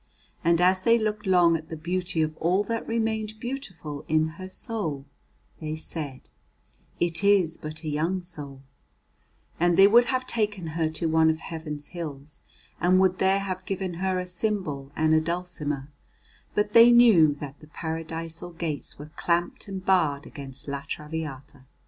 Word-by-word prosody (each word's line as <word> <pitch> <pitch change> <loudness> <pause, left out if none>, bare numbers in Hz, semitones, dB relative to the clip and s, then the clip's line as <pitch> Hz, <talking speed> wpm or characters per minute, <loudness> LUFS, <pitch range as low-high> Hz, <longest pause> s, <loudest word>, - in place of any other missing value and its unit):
And 170 0 +3
as 185 +1 +4
they 230 +4 +5
looked 215 -2 -2
long 175 -3 +5
at 160 0 -5
the 160 - -5
beauty 175 0 0
of 155 0 -3
all 180 +5 +2
that 230 +2 -3
remained 220 -1 -1
beautiful 195 - -6
in 155 0 +2
her 185 +4 -9
soul 180 - -2 0.5
they 155 -1 -4
said: 150 -4 -5 0.8
'It 170 +2 0
is 195 -5 +4
but 155 +1 -8
a - - -5
young 165 +5 -1
soul;' 145 -6 -7 1.0
and 175 0 +3
they 195 - +9
would 235 +4 +6
have 255 +1 -1
taken 210 -7 -1
her 160 -1 0
to 160 +1 -3
one 160 0 +4
of 160 - +1
Heaven's 155 -3 -6
hills, 150 -4 -7 0.4
and 180 +2 +4
would 185 -1 +3
there 190 +1 +3
have 185 -2 -4
given 190 -3 -2
her 185 +2 -1
a 180 - -2
cymbal 180 -7 -2
and 155 0 +2
a 155 - +5
dulcimer, 155 -4 -3 0.6
but 210 0 +1
they 230 +1 +9
knew 210 -12 +6
that 145 -1 -8
the 155 - -15
Paradisal 165 +2 -4
gates 160 -4 -4
were 150 +1 -10
clamped 175 +3 -1
and 190 -1 -6
barred 155 -7 +2
against 140 -2 -9
La 140 0 -3
Traviata. 145 -3 -6
170 Hz, 165 wpm, -26 LUFS, 155-190 Hz, 1.0 s, they